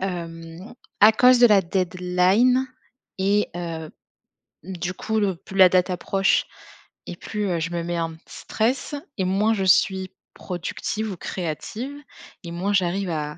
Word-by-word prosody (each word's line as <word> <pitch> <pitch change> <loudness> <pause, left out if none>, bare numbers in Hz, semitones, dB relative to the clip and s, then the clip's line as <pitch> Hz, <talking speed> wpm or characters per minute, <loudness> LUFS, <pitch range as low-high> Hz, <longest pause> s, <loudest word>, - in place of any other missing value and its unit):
hem, 170 +2 -6 0.3
à 215 +2 +8
cause 250 +3 +5
de 240 - +8
la 205 -3 +5
deadline 185 +8 +2 0.5
et 200 +2 +1
heu, 165 -3 -5 0.7
du 180 0 -5
coup, 220 +3 -2
le 195 -3 0
plus 195 +2 -12
la 185 -2 +8
date 185 +1 +2
approche 195 +2 +1 0.6
et 175 - -6
plus 210 +2 -4
heu 170 - 0
je 165 +1 -3
me 170 -1 -2
mets 175 0 -3
un 165 -1 -2
petit 160 - -16
stress 250 +6 -1 0.2
et 190 - 0
moins 205 +4 +2
je 195 - -1
suis 190 0 +2 0.2
productive 200 +4 -4
ou 185 - -7
créative 195 - -5 0.5
et 170 - -7
moins 185 +4 -2
j'arrive 190 0 0
à 150 -1 -4
185 Hz, 155 wpm, -23 LUFS, 175-210 Hz, 0.7 s, à